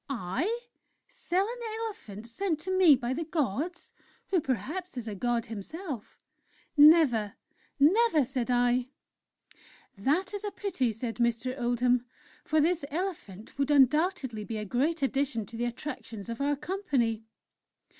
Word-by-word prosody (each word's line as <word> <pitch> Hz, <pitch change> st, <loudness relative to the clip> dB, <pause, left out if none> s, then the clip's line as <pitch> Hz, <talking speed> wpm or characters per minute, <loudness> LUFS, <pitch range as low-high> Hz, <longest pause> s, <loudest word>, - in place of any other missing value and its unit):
"'I? 275 Hz, -, -2 dB, 0.5 s
Sell 390 Hz, -6 st, -1 dB
an 485 Hz, +1 st, -6 dB, 0.2 s
elephant 230 Hz, -, -6 dB
sent 320 Hz, +7 st, -2 dB
to 375 Hz, +2 st, -2 dB
me 360 Hz, -6 st, +7 dB
by 245 Hz, 0 st, -2 dB
the 325 Hz, +5 st, -2 dB
Gods... 315 Hz, -, -2 dB, 0.4 s
who 365 Hz, -4 st, +2 dB
perhaps 305 Hz, -, -3 dB
is 235 Hz, -2 st, -5 dB
a 215 Hz, -, -3 dB
God 240 Hz, +3 st, -1 dB
himself?... 250 Hz, -, -7 dB, 0.6 s
Never! 290 Hz, -9 st, +6 dB, 0.4 s
Never!' 325 Hz, -, +5 dB
said 255 Hz, -1 st, -3 dB
I. 245 Hz, 0 st, +2 dB, 1.1 s
"'That 300 Hz, -, 0 dB
is 410 Hz, 0 st, -4 dB
a 415 Hz, -, -1 dB
pity,' 340 Hz, -, -1 dB
said 225 Hz, +1 st, -5 dB
Mr. 235 Hz, +1 st, 0 dB
Oldham: 245 Hz, -1 st, +1 dB, 0.4 s
'for 310 Hz, -, +2 dB
this 330 Hz, +1 st, +2 dB
elephant 290 Hz, -, -5 dB
would 280 Hz, 0 st, +1 dB
undoubtedly 290 Hz, -, +3 dB
be 220 Hz, +1 st, -5 dB
a 210 Hz, -, -4 dB
great 280 Hz, -, 0 dB
addition 270 Hz, -4 st, 0 dB
to 230 Hz, -, -11 dB
the 235 Hz, +1 st, -1 dB
attractions 235 Hz, -4 st, -6 dB
of 230 Hz, +3 st, -4 dB
our 290 Hz, +1 st, +2 dB
company.' 275 Hz, -, -1 dB
270 Hz, 140 wpm, -29 LUFS, 235-340 Hz, 1.1 s, me